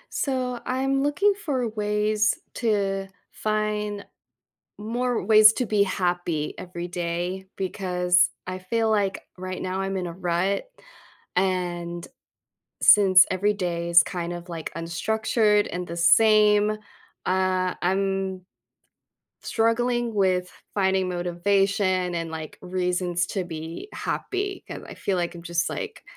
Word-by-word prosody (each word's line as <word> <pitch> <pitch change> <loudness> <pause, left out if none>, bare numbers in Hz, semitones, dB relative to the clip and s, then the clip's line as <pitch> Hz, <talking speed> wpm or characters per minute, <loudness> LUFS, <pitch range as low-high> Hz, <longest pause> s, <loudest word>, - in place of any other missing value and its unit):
So, 255 -3 -1
I'm 270 +1 0
looking 370 +9 +3
for 285 - -2
ways 210 0 +1 0.2
to 195 -4 0 0.2
find 210 -1 -2 0.7
more 235 +1 -1
ways 215 +1 +8
to 250 - -1
be 210 -1 +3
happy 175 -5 -1
every 175 -1 -6
day 175 +2 -3
because 180 -1 +1 0.2
I 185 0 -4
feel 225 +5 0
like 200 -3 0
right 185 0 -5
now 185 +1 -3
I'm 195 0 -2
in 185 -1 -2
a 170 - -5
rut, 180 +2 -1 0.7
and 175 -2 -1 0.8
since 190 -3 +7
every 205 +3 +1
day 170 -3 -2
is 170 0 +8
kind 175 -1 -4
of, 175 0 -8
like, 165 -2 -6
unstructured 210 +5 +1
and 180 0 -3
the 170 - -6
same, 210 +4 +5 0.6
uh, 185 0 +1
I'm 190 0 0 1.0
struggling 240 +1 0
with 185 -3 +1 0.2
finding 190 -2 +1
motivation 185 +1 +1
and, 165 -1 -3
like, 160 -1 -7
reasons 180 -1 -1
to 190 - -2
be 165 - -7
happy, 390 0 -3
'cause - - -7
I - - -8
feel, 195 -2 -1
like, 175 0 -2
I'm 170 - -10
just, 170 0 -1
like, - - -6
190 Hz, 125 wpm, -25 LUFS, 175-215 Hz, 1.0 s, ways